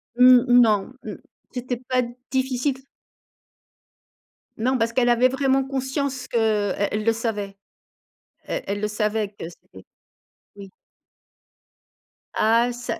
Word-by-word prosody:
Mmh, 250 0 +7
mmh, 245 0 +6
non, 215 +1 +2
mmh, - - -6 0.4
c'était 250 -1 -4
pas 255 0 -1 0.3
difficile 265 0 0
s 265 - -19 1.7
Non, 255 +4 +1
parce 230 0 0
qu'elle 245 -1 +2
avait 240 +2 +4
vraiment 270 0 +1
conscience 265 0 -3
que 235 - -2
e 205 -3 +1
elle 210 0 -2
le 230 - +3
savait. 210 -4 -4 0.9
Elle - - -4
elle 205 +1 -3
le 210 - -1
savait 210 0 -1
que 200 -5 -9
c'était 95 - -16 0.7
Oui. 195 -1 -11 1.7
Ah, 230 +3 +3
ça, 245 +1 -5
240 Hz, 130 wpm, -23 LUFS, 210-255 Hz, 1.7 s, Mmh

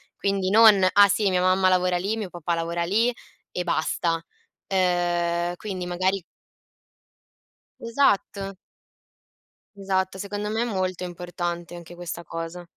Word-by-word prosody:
quindi 195 -1 0
non: 215 -2 +7
"Ah 205 0 +8
sì 200 +1 +2
mia 180 -1 +1
mamma 185 +1 +3
lavora 180 -1 +2
lì, 200 +5 -2
mio 210 -4 -4
papà 175 -1 -2
lavora 170 +1 -2
lì 225 +8 +2 0.4
e 180 - -2
basta." 165 0 -1 0.4
Ehm, 175 -2 +1
quindi 185 -3 -5
magari 185 +1 0 1.6
Esatto. 200 -5 0 1.2
Esatto, 190 -1 -1
secondo 205 +1 -4
me 225 +2 0
è - - +1
molto 185 -5 -2
importante 175 -1 -5
anche 175 0 -10
questa 170 -1 -6
cosa. 165 +2 -6
185 Hz, 125 wpm, -25 LUFS, 175-200 Hz, 1.6 s, Ah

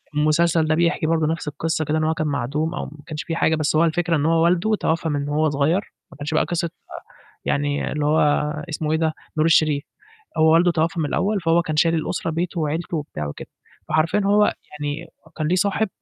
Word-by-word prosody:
المسلسل 155 +2 +2
ده 155 - +2
بيحكي 170 -1 +1
برضه 160 -2 +2
نَفْس 165 -1 -3
القصة 155 +2 -2
كده 155 +2 0
إن 155 - 0
هو 160 +1 +2
كان 155 -1 -2
معدوم 150 +4 -1
أو - - -3
ما - - -10 0.2
كنش 150 -1 -4
في 165 - -3
حاجة، 160 -1 +2
بس 155 0 0
هو 160 - +4
الفكرة 165 +1 +1
إن 145 - 0
هو 165 0 +3
والده 180 +5 +2
توفّى 165 -4 -1
من 145 0 -2
وهو 155 +1 +2
صغير، 150 +8 0 0.2
ما - - -14
كانش 145 +2 -4
بقى 155 - +3
قصة 170 0 -2 0.8
يعني 145 0 -1
اللي 150 -1 -1
هو 155 +2 +3 0.5
اسمه 155 -1 -2
إيه 160 - +2
ده، 160 -1 0 0.2
نور 155 - +3
الشريف. 155 -3 +3 0.6
هو 160 0 +5
والده 175 +2 +5
توفّى 165 0 0
من 150 - 0
الأول، 205 +6 0
فهو 165 +1 +3
كان 155 -2 -3
شايل 165 +1 +3
الأسرة 165 +1 -2
بيته 170 +2 -2
وعيلته 160 +2 -2
وبتاع 110 - -4
وكده. 75 - -8 0.4
فحرفيًا 160 +6 +2
هو 205 +1 +4 0.3
يعني 145 0 -4 0.3
كان 155 - -1
ليه 180 - +2
صاحب 200 +2 +1
160 Hz, 215 wpm, -22 LUFS, 150-170 Hz, 0.8 s, هو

